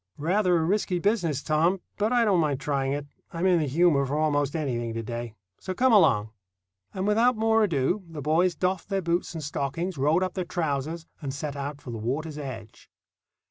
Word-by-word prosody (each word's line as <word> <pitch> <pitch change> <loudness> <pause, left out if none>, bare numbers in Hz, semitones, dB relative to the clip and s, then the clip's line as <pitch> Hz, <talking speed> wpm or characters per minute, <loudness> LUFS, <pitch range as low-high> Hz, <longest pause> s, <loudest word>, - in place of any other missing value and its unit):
"Rather 180 +3 +2
a 160 - +1
risky 185 +1 0
business, 175 - 0
Tom, 165 +5 +2 0.2
but 210 +2 +1
I 240 -2 +4
don't 195 -5 +3
mind 145 -4 +1
trying 135 -1 -1
it. 145 0 -2 0.3
I'm 170 +2 -2
in 180 -2 +4
the 155 - 0
humour 150 0 +3
for 140 +2 -2
almost 145 -2 +1
anything 120 -7 -2
to 115 - -3
day; 115 0 -5 0.2
so 185 - -5
come 255 +2 +3
along." 110 - +4 0.6
And 190 0 -3
without 225 +3 +3
more 225 0 +3
ado 170 +1 0
the 160 -2 -7
boys 165 +5 +2
doffed 185 +1 -1
their 195 -2 -1
boots 170 +1 -1
and 160 - -5
stockings, 150 +4 -3
rolled 155 +6 +3
up 185 - -2
their 185 - -2
trousers, 165 -2 -2 0.2
and 140 -3 -3
set 145 +1 -5
out 140 +1 -5
for 125 - -8
the 115 - -5
water's 145 +7 -3
edge. 115 -6 -8
160 Hz, 200 wpm, -26 LUFS, 140-185 Hz, 0.6 s, I